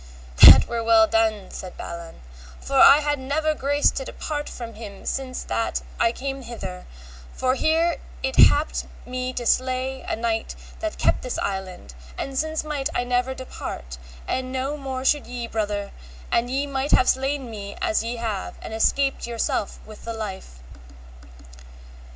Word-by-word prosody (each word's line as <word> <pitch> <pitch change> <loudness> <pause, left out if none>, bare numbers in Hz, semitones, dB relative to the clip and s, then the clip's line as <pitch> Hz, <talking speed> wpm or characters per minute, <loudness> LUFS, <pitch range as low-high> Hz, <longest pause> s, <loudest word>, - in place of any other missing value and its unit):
That - - +10
were 235 -1 -2
well 225 -1 +6
done, 220 -3 0
said 185 - -8
Balan, 170 -1 -8 0.4
for - - -2
I 290 - +9
had 295 -1 0
never 305 +4 0
grace 285 0 +2
to 265 - -4
depart 295 +2 -5
from 235 -2 -7
them 210 -3 -10
since 260 -1 -3
that 230 - -2 0.2
I 230 - +4
came 270 +2 -5
hither, 190 -7 -7 0.5
for 255 0 +1
here 325 +4 +2 0.3
it 265 0 -1
happed 295 +2 -1 0.2
me 255 0 -3
to 245 -1 -4
slay 255 +1 0
a - - -3
knight 225 -1 -2 0.2
that 325 -1 -3
kept - - +2
this 250 - -4
island, 190 - -4 0.2
and 270 - -4
since 315 +3 -1
might 295 -2 -2
I - - +1
never 250 +1 0
depart, 65 - -7 0.3
and 255 0 -2
no 265 +3 -2
more 265 -2 -5
should 295 +1 +2
ye, 245 -1 -5
brother, 210 -3 -3 0.4
an 235 - +2
ye 270 +3 0
might 275 0 -1
have 255 - +5
slain 270 -1 0
me 200 -2 -7
as 335 -9 +1
ye 235 +1 -3
have, 225 -4 -4
and - - -7
escaped 270 +4 +1
yourself 230 -3 -2
with 215 -1 -12
the 230 - -3
life. 190 - -7
255 Hz, 165 wpm, -24 LUFS, 220-275 Hz, 0.5 s, That